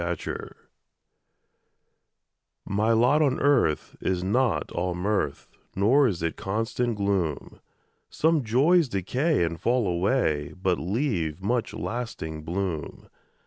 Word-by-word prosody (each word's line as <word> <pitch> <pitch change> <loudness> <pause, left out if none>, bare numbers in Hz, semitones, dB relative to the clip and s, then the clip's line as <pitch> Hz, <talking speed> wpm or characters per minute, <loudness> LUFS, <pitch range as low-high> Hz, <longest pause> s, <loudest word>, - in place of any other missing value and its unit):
MY - - -2 0.2
LOT - - -6 2.1
My 105 +3 +1
lot 125 +7 +4
on 140 -3 +2
earth 135 - +2
is 90 -1 -1
not 120 +5 +1
all 90 0 -2
mirth, 100 +4 -1 0.3
Nor 130 +9 +4
is 90 -7 -2
it 85 - -1
constant 115 +3 -2
gloom; 95 -7 -1 0.5
Some 160 -2 +2
joys 140 +8 +3
decay 120 - 0
and 85 -1 -3
fall 120 -3 +1
away, 85 - 0
But 90 -2 +1
leave 90 - -1
much 120 +3 -1
lasting 110 -10 -5
bloom. 85 -1 -4
105 Hz, 115 wpm, -26 LUFS, 90-125 Hz, 2.1 s, lot